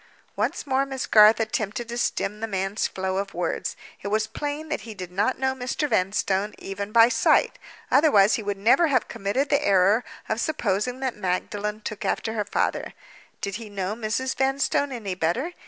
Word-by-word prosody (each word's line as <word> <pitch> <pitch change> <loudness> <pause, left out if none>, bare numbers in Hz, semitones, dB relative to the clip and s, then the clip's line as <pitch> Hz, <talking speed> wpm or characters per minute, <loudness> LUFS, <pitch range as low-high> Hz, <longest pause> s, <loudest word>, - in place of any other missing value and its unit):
Once - - -1
more 270 -1 +2
Miss 270 -1 -4
Garth 215 +1 +7
attempted 220 +1 -2
to 235 - -4
stem 210 -3 -1
the 225 - -3
man's 195 0 -1
flow 190 0 -3
of 195 -2 -3
words. 175 -1 -2 0.3
It - - -5
was 215 +2 +1
plain 290 +7 -5
that - - -2
he 220 -1 -9
did 185 -3 -7
not 205 +7 0
know 265 0 0
Mr. 260 +3 -2
Vanstone, 195 -1 0
even 200 +1 -6
by 230 0 +7
sight—otherwise 235 -3 +3
he - - 0
would 205 -1 -3
never 235 - +4
have 260 -5 +1
committed 230 +9 -1
the 285 - +2
error 200 +4 +4 0.2
of 220 +2 -1
supposing 250 - -1
that 260 -2 -1
Magdalen 210 +2 -2
took 215 -1 -6
after 220 - -1
her 210 -2 -1
father. - - -1 0.5
Did 200 0 -3
he 225 -2 -9
know 195 -1 -3
Mrs. 235 +4 -2
Vanstone 270 +1 +1
any 215 -7 -4
better? 185 - -1
215 Hz, 180 wpm, -25 LUFS, 200-255 Hz, 0.5 s, Garth